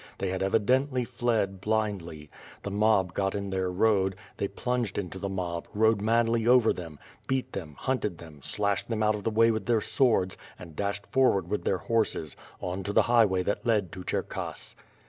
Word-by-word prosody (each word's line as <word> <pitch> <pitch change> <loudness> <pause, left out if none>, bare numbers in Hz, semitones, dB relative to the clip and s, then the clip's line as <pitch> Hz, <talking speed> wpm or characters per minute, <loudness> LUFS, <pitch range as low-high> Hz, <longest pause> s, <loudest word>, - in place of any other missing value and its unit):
They 95 - -2
had 95 - -3
evidently 125 +6 +2
fled 115 -6 -1
blindly. 100 -9 -2 0.3
The 100 - -4
mob 100 -3 +2
got 95 0 -1
in 100 -1 -3
their 95 -1 0
road; 95 0 +2 0.2
they 100 - -1
plunged 125 +1 -2
into 95 -1 -4
the 100 - -3
mob, 90 -3 -3
rode 110 -1 +3
madly 115 +1 +2
over 125 -2 +5
them; 85 -4 -8 0.3
beat 130 -1 -1
them, 80 -6 -6
hunted 115 -9 -1
them, 80 -3 -12
slashed 100 +7 -1
them 110 -2 0
out 105 0 +3
of 105 -1 -5
the - - +1
way 115 +1 +4
with 110 0 -3
their 115 -2 +3
swords 110 -6 +1 0.2
and 85 -3 -11
dashed 100 +2 -2
forward 100 -9 +2
with 105 - -1
their 95 - +2
horses, 105 -8 -1 0.2
on 90 +2 -3
to 100 +2 -4
the - - +5
highway 110 -6 +3
that 100 - -2
led 105 -7 +1
to 90 - -8
C'herkass. - - -4
100 Hz, 185 wpm, -28 LUFS, 95-115 Hz, 0.3 s, over